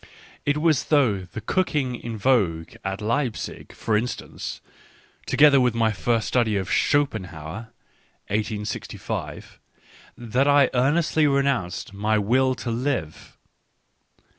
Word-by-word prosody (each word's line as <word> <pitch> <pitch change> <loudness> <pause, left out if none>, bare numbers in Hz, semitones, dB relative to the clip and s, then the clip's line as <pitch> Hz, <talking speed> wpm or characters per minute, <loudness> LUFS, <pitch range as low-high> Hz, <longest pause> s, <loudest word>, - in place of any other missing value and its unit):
It 145 +1 +2
was 155 -2 +2
through 110 - +2
the 110 - -5
cook 185 - 0
ing 130 -4 0
in 115 -2 -6
vogue 100 -9 +1
at 95 +2 -3
Leipzig, 115 +2 -2
for 110 - -1
instance, 120 +4 -4 0.7
together 140 0 +6
with 125 -2 +2
my 115 -1 +2
first 115 +3 0
study 115 -4 +1
of 95 -1 -3
Schopenhauer 110 - -1 0.6
(1865), 105 0 -4 0.6
that 125 +4 0
I 145 -1 +5
earnestly 150 +4 +2
renounced 140 -11 0
my 105 +2 +1
"Will 130 +5 +2
to 120 -1 -4
Live." 115 - -3
120 Hz, 115 wpm, -24 LUFS, 105-140 Hz, 0.7 s, together